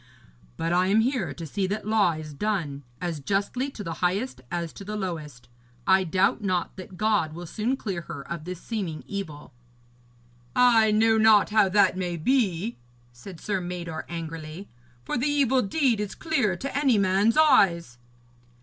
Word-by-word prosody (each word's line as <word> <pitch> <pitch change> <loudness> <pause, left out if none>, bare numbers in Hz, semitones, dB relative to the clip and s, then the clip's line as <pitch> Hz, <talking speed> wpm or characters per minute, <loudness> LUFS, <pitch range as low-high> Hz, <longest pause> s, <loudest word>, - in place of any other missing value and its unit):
But 165 +1 -1
I 180 +1 +3
am 210 +3 +4
here 255 +2 0
to 165 - -7
see 190 +6 -2
that 205 +2 -3
law 215 -5 +3
is 155 -1 -7
done, 160 -6 -2 0.2
as 170 -3 -3
justly 200 - -1
to 225 -6 -8
the 165 -3 -4
highest 185 - -1
as 170 -2 -3
to - - -10
the 210 +2 -5
lowest. 155 - -5 0.4
I 190 0 +4
doubt 190 +5 +1
not 185 -3 -1
that 185 -1 -10
God 210 -7 +1
will 175 +2 -7
soon 225 +9 -2
clear 195 -9 -4
her 165 -5 -8
of 170 -2 -5
this 180 -1 -6
seeming 185 -10 -4
evil.' 160 - -7 1.0
'I 235 -3 +5
know 220 +1 +4
not 215 -1 +5
how 210 -3 +4
that 200 -1 +3
may 175 -2 -2
be,' 210 - 0 0.4
said 160 +8 -11
Sir 195 -3 -2
Mador 175 -3 -5
angrily, 165 +2 -6 0.4
'for 245 - -2
the 265 - +1
evil 275 -3 +3
deed 245 +1 +1
is 210 -1 -4
clear 265 - 0
to 275 +8 -5
any 275 -5 +3
man's 200 +5 +2
eyes.' 170 - +4
190 Hz, 170 wpm, -26 LUFS, 170-220 Hz, 1.0 s, I